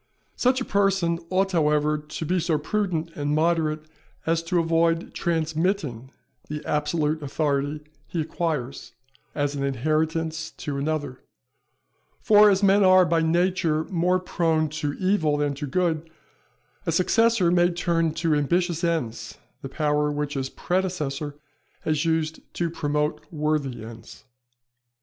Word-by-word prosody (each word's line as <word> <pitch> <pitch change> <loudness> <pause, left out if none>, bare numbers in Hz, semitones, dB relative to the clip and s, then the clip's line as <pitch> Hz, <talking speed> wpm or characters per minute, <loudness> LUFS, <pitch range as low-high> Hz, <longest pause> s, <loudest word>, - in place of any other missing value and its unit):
Such 255 +1 +2
a 250 - -3
person 195 -4 +1
ought 190 +1 +1
however 150 -3 +2
to 150 +1 -6
be 180 +3 +1
so 165 -2 +1
prudent 170 -1 -2
and 145 0 -1
moderate 155 -1 +1 0.4
as 165 0 +1
to 180 +1 0
avoid 165 0 +1
transmitting 160 - -1 0.4
the 150 0 -5
absolute 150 +1 0
authority 145 0 -1 0.3
he 170 - -4
acquires, 150 -7 -3 0.4
as 145 -1 0
an 140 - -4
inheritance 155 +4 -1
to 145 -3 -4
another; 145 -3 -2 1.0
for 210 0 +6
as 195 0 +2
men 200 +1 +5
are, 185 -1 +6
by 165 0 +2
nature, 170 -1 +1
more 180 +1 +2
prone 165 -3 0
to 150 -1 -3
evil 175 -5 +1
than 145 -1 0
to 145 +1 -5
good, 165 +1 0 0.8
a - - +2
successor 195 +2 +3
may 175 0 +4
turn 170 -2 0
to 165 -1 +1
ambitious 170 +3 0
ends 160 -10 -2 0.2
the 135 - -6
power 150 0 0
which 145 0 -3
his 135 -2 -2
predecessor 155 -7 -2 0.5
has 155 +1 0
used 160 -1 0 0.2
to 170 -1 -1
promote 150 -1 -1
worthy 150 -7 -2
ends. 115 -1 -12
160 Hz, 135 wpm, -25 LUFS, 150-175 Hz, 1.0 s, for